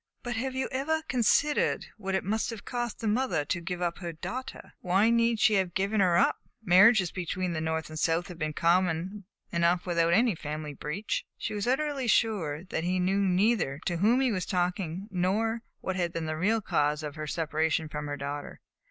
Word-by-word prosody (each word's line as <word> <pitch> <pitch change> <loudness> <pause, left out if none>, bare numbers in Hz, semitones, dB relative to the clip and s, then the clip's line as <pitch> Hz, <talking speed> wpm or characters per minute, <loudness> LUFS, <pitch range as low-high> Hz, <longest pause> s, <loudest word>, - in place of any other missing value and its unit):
"But 245 0 -3
have 260 +3 -2
you 260 - -1
ever 315 +4 -1
considered 285 +2 +2
what 195 -3 -3
it 190 - 0
must 220 +4 -1
have 225 -3 -7
cost 240 -2 -3
the 225 - -1
mother 215 - +1
to 170 +3 -2
give 180 +1 -4
up 170 -1 -2
her 175 -3 -4
daughter?" 250 +11 -7
"Why 195 +5 +3
need 230 -1 +2
she 215 - +4
have 190 -4 +1
given 200 +3 +1
her 180 -3 +4
up? - - +3 0.3
Marriages 190 0 +6
between 180 0 -3
the 160 - -2
North 160 0 -2
and 155 - -10
the - - -6
South 165 +1 +1
have 180 -3 -10
been 155 0 -2
common 180 +4 +1 0.3
enough 170 +1 +2
without 170 -1 +2
any 230 +3 +4
family 150 -2 -5
breach." 150 +9 -3
She 215 - -4
was 205 +1 -2
utterly 275 0 0
sure 180 -10 +1
that 170 -3 -3
he 180 +1 0
knew 190 +2 +1
neither 190 -6 +2
to 175 - 0
whom 225 +8 +3
he 260 -2 +2
was 185 -4 -2
talking 180 0 -1
nor 210 +5 0 0.2
what 190 - -2
had 175 -2 0
been 165 -1 -3
the 155 0 -2
real 210 +7 +1
cause 150 -4 0
of 150 -1 -5
her 155 0 -6
separation 160 0 0
from 150 -1 -5
her 145 0 -4
daughter. 145 +1 -6
185 Hz, 205 wpm, -28 LUFS, 165-220 Hz, 0.3 s, Marriages